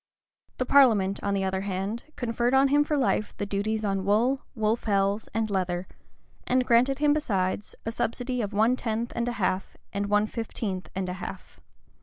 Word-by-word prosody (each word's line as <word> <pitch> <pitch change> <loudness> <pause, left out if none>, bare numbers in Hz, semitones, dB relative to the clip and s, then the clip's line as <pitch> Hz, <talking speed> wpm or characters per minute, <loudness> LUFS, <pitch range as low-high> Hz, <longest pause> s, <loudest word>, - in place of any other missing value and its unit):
[] - - -44
The 255 - 0
parliament, 220 -9 +4
on 200 0 0
the 195 - 0
other 190 0 -1
hand, 200 +3 -3
conferred 240 +1 0
on 270 +1 +5
him 290 +1 +4
for 300 0 -1
life 250 -5 0
the 205 - -2
duties 210 +2 -1
on 195 -1 0
wool, 230 +7 +2
wool 220 -1 +2
fells, 200 -2 0
and 225 0 0
leather, 185 -3 -1 0.6
and 255 0 +2
granted 250 +3 +4
him, 295 0 +3
besides, 200 -9 -1
a 225 - -1
subsidy 245 +2 -2
of 205 -2 -3
one 220 +4 +3
tenth 230 -1 -3
and 235 0 -1
a 245 - -1
half, 190 -3 -2 0.2
and 200 0 -1
one 210 +1 +3
fifteenth 215 -4 -4
and 190 -1 -2
a 180 - -3
half. - - -8
220 Hz, 190 wpm, -27 LUFS, 195-245 Hz, 0.6 s, on